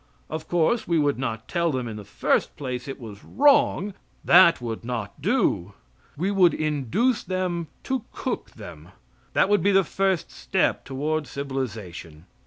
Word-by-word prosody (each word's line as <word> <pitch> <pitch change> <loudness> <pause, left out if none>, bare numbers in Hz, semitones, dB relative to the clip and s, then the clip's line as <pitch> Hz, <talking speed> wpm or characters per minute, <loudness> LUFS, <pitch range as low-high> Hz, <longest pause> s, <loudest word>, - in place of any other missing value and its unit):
Of 155 0 -5
course 175 +7 +1
we 170 -1 +2
would 145 -3 +1
not 115 -4 -3
tell 170 -1 0
them, 130 -3 -2
in 110 - -6
the 105 - -8
first - - 0
place, 125 -2 -4
it 135 - -6
was 105 -4 -10
wrong. 275 -8 +3 0.3
That 170 -1 +7
would 115 -2 -5
not 115 -4 -5
do. 95 +4 +1 0.4
We 185 +6 0
would 185 -4 +4
induce 155 - 0
them 180 -3 -2 0.2
to 260 -4 -2
cook - - -4
them. - - -11 0.5
That - - +4
would 205 0 +3
be 200 - +3
the 195 0 +5
first 190 0 -1
step - - 0
toward 150 +2 -2
civilization. 110 - -6
150 Hz, 160 wpm, -25 LUFS, 120-185 Hz, 0.5 s, That